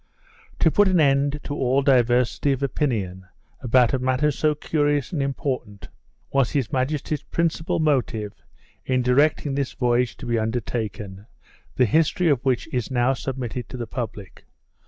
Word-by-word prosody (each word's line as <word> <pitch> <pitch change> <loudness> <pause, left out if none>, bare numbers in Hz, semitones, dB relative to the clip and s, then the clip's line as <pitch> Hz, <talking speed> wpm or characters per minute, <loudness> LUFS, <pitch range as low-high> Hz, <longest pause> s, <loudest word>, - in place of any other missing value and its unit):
To 160 - +3
put 205 +4 +4
an 185 -2 +3
end 140 0 +2
to 145 - -5
all 135 0 +1
diversity 125 +1 +2
of 135 +1 -4
opinion 100 -10 -2 0.3
about 125 0 +3
a 130 - +1
matter 130 +4 +1
so 150 +2 +1
curious 145 -2 0
and 155 - -1
important, 135 -7 -4 0.4
was 135 -3 +3
his 135 -7 -1
majesty's 140 +2 -1
principal 165 -1 -1
motive 120 -9 0 0.5
in 130 -1 0
directing 140 +3 +2
this 140 -1 -2
voyage 120 -1 0
to 130 - -9
be 120 -1 0
undertaken, 110 -3 -4 0.5
the 125 - +4
history 160 - +2
of 135 -4 +1
which 130 0 0
is 125 -3 -1
now 125 0 +2
submitted 125 -1 -5
to 130 - -7
the 120 - -4
public. 110 -5 -7
130 Hz, 155 wpm, -23 LUFS, 120-145 Hz, 0.5 s, put